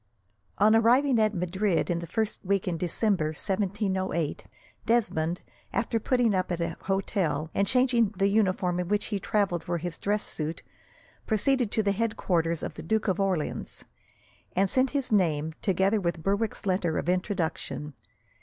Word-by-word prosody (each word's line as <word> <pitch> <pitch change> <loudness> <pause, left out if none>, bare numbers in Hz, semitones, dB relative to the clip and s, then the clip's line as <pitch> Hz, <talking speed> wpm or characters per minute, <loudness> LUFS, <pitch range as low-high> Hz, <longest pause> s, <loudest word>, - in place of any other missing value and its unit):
On 215 +2 +5
arriving 245 +3 +4
at 215 -1 +2
Madrid 180 +1 0
in 170 - 0
the 170 - -6
first 220 +4 -2
week 195 -1 0
in 175 - 0
December, 180 +1 0
1708, 190 -3 -2 0.4
Desmond, 180 -8 +1 0.3
after 230 -1 0
putting 240 -1 +2
up 185 -1 0
at 175 - -1
an 170 0 -2
hotel, 170 -5 -1
and 200 - +1
changing 250 -2 +3
the 195 - +2
uniform 185 -3 +1
in 180 - -2
which 210 +2 +1
he 200 - 0
travelled 195 -3 0
for 175 0 -2
his 170 0 -5
dress 210 +1 0
suit, 155 +1 -4 0.6
proceeded 245 +2 +2
to 220 - 0
the 200 - +2
headquarters 180 -6 0
of - - -4
the - - -8
Duke 220 +6 0
of 190 0 +1
Orleans, 190 -6 -2 0.7
and 190 0 +2
sent 260 0 +3
in - - -17
his 275 -4 -1
name, 160 -6 +2
together 195 +2 +2
with 170 -2 -2
Berwick's 200 +4 -1
letter 185 -4 0
of - - -3
introduction. 180 -5 -2
195 Hz, 165 wpm, -27 LUFS, 175-215 Hz, 0.7 s, On